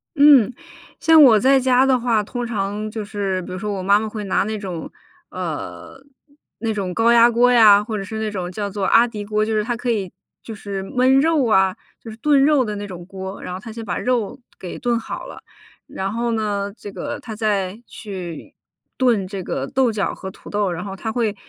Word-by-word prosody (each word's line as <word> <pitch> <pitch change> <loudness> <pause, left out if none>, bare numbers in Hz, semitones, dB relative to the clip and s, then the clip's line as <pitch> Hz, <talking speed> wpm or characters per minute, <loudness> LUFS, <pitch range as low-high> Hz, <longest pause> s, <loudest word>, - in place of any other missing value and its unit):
嗯， 280 -5 +6 0.5
像 320 -1 +6
我 225 -5 +7
在 270 +3 +4
家 255 0 +3
的 255 -2 +3
话， 230 -3 +1
通 245 +3 -5
常 210 -1 -3
就 215 -1 -4
是 200 -3 -3
比 180 - -9
如 185 - -5
说 210 +2 -3
我 190 - -4
妈 200 +2 +4
妈 220 - -3
会 215 -1 -6
拿 195 - +1
那 215 +1 -3
种 180 -5 -6 0.4
呃， 270 +1 -6 0.6
那 225 0 -1
种 190 -3 -3
高 230 +1 +3
压 235 0 +6
锅 245 +2 +4
呀， 210 -4 +7
或 220 -1 -4
者 195 - -4
是 220 +2 -6
那 220 -1 -2
种 185 -3 -4
叫 205 +1 -4
做 200 -1 -3
阿 235 +4 +5
迪 210 -3 -7
锅， 215 +1 0
就 220 +1 -1
是 210 - +1
它 240 +2 -2
可 245 +1 -4
以 200 -6 -1 0.3
就 225 - -7
是 200 -2 -6
焖 255 +6 +3
肉 305 -3 +2
啊， 190 -3 +3 0.2
就 225 - -10
是 220 - -11
炖 280 +2 +3
肉 295 -4 +4
的 210 -2 -4
那 205 0 -5
种 180 -3 -8
锅。 190 0 -7
然 - - -6
后 185 - -5
她 225 +2 -9
先 225 0 -7
把 180 -5 -3
肉 245 0 -1 0.2
给 180 - -7
炖 240 -2 0
好 - - -7
了， - - -10 0.5
然 195 +1 -4
后 235 0 -1
呢， 205 -2 -2
这 205 - -9
个 185 -3 -5
她 220 -3 -8
再 205 -1 -1
去 185 -6 -8 0.4
炖 235 -7 +2
这 190 0 -6
个 - - -3
豆 260 -3 +1
角 210 -3 -2
和 190 - -7
土 - - -16
豆。 205 -3 0
然 175 +3 -5
后 195 -1 -6
她 220 +3 -4
会， 220 -3 -1
215 Hz, 240 characters per minute, -21 LUFS, 195-235 Hz, 0.6 s, 我